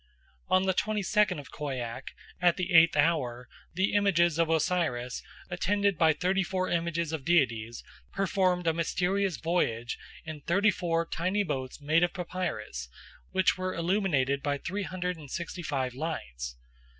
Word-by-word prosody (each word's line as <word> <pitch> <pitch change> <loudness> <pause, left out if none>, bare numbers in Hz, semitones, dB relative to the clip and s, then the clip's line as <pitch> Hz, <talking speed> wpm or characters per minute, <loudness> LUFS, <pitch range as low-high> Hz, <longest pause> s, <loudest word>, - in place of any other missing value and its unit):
'" 65 0 -35
On 185 - +4
the 190 0 +2
twenty 210 +2 0
second 210 0 +2
of 140 -6 -9
Khoiak, 130 -3 -5 0.3
at 175 -1 +4
the 180 0 -2
eighth 165 -2 +7
hour, 125 -6 +1 0.3
the 190 +2 +1
images 175 -5 +3
of 165 -1 +3
Osiris, 160 -7 0 0.3
attended 200 +2 +1
by 160 0 +5
thirty 180 +5 +1
four 185 0 -1
images 170 -1 -1
of 155 -4 -3
deities, 120 -9 +1 0.3
performed 185 -2 +1
a 165 - +3
mysterious 180 +2 0
voyage 120 -6 -1 0.3
in 155 -2 -7
thirty 200 +7 +3
four 165 -3 0
tiny 185 +5 0
boats 130 -7 -4
made 155 +3 +2
of 175 - +2
papyrus, 180 - -4 0.4
which 190 -1 +2
were 185 0 -2
illuminated 165 -7 +1
by 145 -1 0
three 190 +8 -4
hundred 180 -2 -3
and 150 -3 -11
sixty 170 +4 -5
five 135 -5 -2
lights. 60 - -5
170 Hz, 155 wpm, -29 LUFS, 140-185 Hz, 0.4 s, eighth